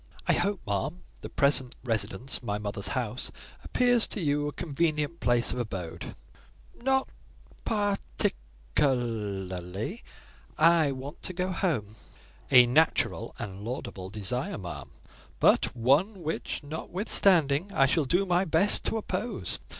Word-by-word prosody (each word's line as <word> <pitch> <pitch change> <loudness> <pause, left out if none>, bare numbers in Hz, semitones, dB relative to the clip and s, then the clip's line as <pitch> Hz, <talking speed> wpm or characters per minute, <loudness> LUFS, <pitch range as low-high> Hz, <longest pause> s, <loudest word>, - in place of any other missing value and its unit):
"I - - +3
hope, 200 -1 0
ma'am, 135 - -2 0.2
the - - -7
present 140 -3 +3
residence, 115 +1 -2
my 105 -4 -2
mother's 100 -1 -3
house, 125 0 -3 0.3
appears 245 -2 +3
to - - +2
you 145 -3 0
a - - -2
convenient 155 0 -1
place 120 0 +1
of 125 - -3
abode?" 95 -8 -5 0.7
"Not 265 +1 +2 0.6
par 205 -2 +1 0.2
tic - - +1 0.4
er 145 -3 +5
er 100 -7 -3
ly; 105 - -5 0.6
I 160 -2 +5
want 135 +3 -7
to 185 - -3
go 180 +1 -1
home." 140 - -1 0.6
"A 125 -2 +8
natural 155 +7 +1
and 100 0 -7
laudable 105 -6 -5
desire, 110 +6 -3
ma'am; 90 -3 -7 0.5
but - - +3
one 155 - +2
which, 160 0 -3
notwithstanding, 165 0 +2
I 155 -8 +4
shall 145 +3 +1
do 180 +8 +2
my 180 0 +2
best 175 +4 +3
to 225 - +1
oppose. 235 +2 -3
140 Hz, 135 wpm, -28 LUFS, 115-175 Hz, 0.7 s, A